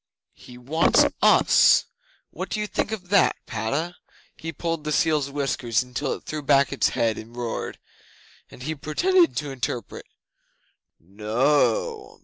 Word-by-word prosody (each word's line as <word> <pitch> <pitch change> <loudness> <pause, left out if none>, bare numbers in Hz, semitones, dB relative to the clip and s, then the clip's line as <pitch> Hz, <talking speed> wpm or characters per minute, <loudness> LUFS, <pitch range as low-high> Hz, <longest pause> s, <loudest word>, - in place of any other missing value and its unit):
'"He 125 - -14
wants 150 +7 +3 0.2
us! - - +5 0.5
What - - -6
do 215 - -3
you 210 - -1
think 210 - -2
of 185 -5 -6
that, 200 -1 +4
Padda?" 140 +11 -3 0.4
He 165 0 -6
pulled 165 -1 -3
the 150 - -3
seal's 150 -2 +1
whiskers 135 -4 -1
till 135 +1 -1
it - - -9
threw 155 -1 -5
back 140 -2 +3
its - - +2
head 115 -2 +1
and 115 +2 -12
roared, 120 -2 -4 0.7
and 125 - -12
he 155 +4 -2
pretended 340 - +2
to 145 -2 -3
interpret. 125 -2 -5 0.9
"No! 140 - 0
145 Hz, 140 wpm, -24 LUFS, 125-165 Hz, 0.9 s, us